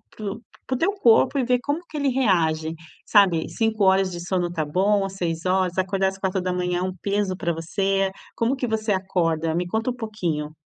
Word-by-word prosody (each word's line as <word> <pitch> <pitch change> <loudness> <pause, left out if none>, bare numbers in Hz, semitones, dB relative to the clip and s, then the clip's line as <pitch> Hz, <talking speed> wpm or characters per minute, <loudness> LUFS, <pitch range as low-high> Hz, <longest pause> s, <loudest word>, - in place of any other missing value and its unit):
para 215 - -7
o 220 - -8 0.3
para - - -1
o - - -1
teu 390 +5 +2
corpo 255 - +4
e 260 - +2
ver 250 0 +2
como 290 +2 -1
que - - -13
ele 285 -2 0
reage, 165 -11 +1 0.3
sabe, 185 -6 +4
5h 195 -4 +2
de 175 - -6
sono 175 -1 -1
tá 160 -3 -2
bom, 195 +6 +2
às 195 - -6
6h, 180 +1 -1
acordar 190 +1 +1
às 190 0 -3
4:00 180 -2 -1
é - - -3
um 185 0 -2
peso 200 -2 0
para 170 -2 -1
você? 195 +4 0 0.2
Como 235 +4 +1
que 260 - -2
você 220 -2 -1
acorda? 165 -4 0
Me 175 +2 -1
conta 225 +6 -1
um - - -7
pouquinho. 170 -10 -3
190 Hz, 200 wpm, -23 LUFS, 175-220 Hz, 0.3 s, corpo